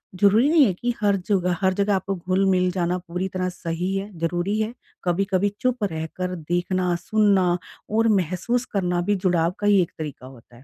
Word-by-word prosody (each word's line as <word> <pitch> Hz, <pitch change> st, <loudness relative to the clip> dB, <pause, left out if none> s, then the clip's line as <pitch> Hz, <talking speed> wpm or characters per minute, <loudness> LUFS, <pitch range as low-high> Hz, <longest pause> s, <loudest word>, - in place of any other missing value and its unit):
ज़रूरी 210 Hz, +8 st, +4 dB
नहीं 315 Hz, -4 st, +6 dB
है 195 Hz, -, +1 dB
कि 240 Hz, +7 st, -2 dB
हर 205 Hz, -1 st, +3 dB
जगह 180 Hz, -3 st, +2 dB
हर 190 Hz, 0 st, +3 dB
जगह 200 Hz, +1 st, +1 dB
आपको 195 Hz, +1 st, -2 dB
घुल 185 Hz, +2 st, 0 dB
मिल 185 Hz, -1 st, +3 dB
जाना 180 Hz, 0 st, 0 dB
पूरी 180 Hz, +1 st, -4 dB
तरह 185 Hz, -1 st, -2 dB
सही 180 Hz, +1 st, -3 dB
है, 195 Hz, +1 st, -3 dB
ज़रूरी 175 Hz, +5 st, -1 dB
है। 220 Hz, +2 st, -1 dB, 0.3 s
कभी-कभी 190 Hz, +2 st, +1 dB
चुप 255 Hz, -3 st, 0 dB
रहकर 180 Hz, +1 st, -3 dB
देखना, 175 Hz, +2 st, -1 dB
सुनना 190 Hz, -1 st, +2 dB, 0.3 s
और 225 Hz, +2 st, +2 dB
महसूस 200 Hz, +5 st, 0 dB
करना 180 Hz, -3 st, 0 dB
भी, 205 Hz, +4 st, +1 dB
जुड़ाव 175 Hz, -3 st, +1 dB
का 205 Hz, -, 0 dB
ही 200 Hz, -2 st, +5 dB
एक 170 Hz, -, -2 dB
तरीका 150 Hz, -5 st, -7 dB
होता 120 Hz, -2 st, -16 dB
है। 120 Hz, -, -16 dB
185 Hz, 190 wpm, -23 LUFS, 175-205 Hz, 0.3 s, नहीं